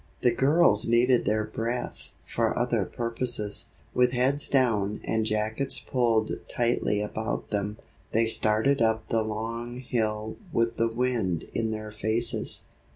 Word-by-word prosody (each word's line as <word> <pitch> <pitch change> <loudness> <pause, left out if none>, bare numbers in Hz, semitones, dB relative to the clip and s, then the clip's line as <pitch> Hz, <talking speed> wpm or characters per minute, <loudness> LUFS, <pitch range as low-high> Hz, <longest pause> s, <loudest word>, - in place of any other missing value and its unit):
The 120 - +4
girls 135 -6 +4
needed 120 +2 +4
their 110 +1 +1
breath 115 +3 -4
for - - 0
other - - +1
purposes. 115 -3 -1 0.2
With 125 0 +3
heads 135 +4 +2
down 110 -6 +1
and 110 -1 0
jackets 110 +5 0
pulled 115 -4 +1 0.2
tightly 120 -3 +1
about 110 +2 -4
them, 105 0 -2 0.3
they 115 +1 +3
started 110 +5 +2
up 110 -1 +1
the 115 - +2
long 115 +3 -4
hill 110 -3 -2
with 115 -4 0
the 115 - +2
wind 115 -8 0
in 115 -1 0
their 110 -1 -5
faces. 110 +3 -1
115 Hz, 135 wpm, -27 LUFS, 110-120 Hz, 0.3 s, The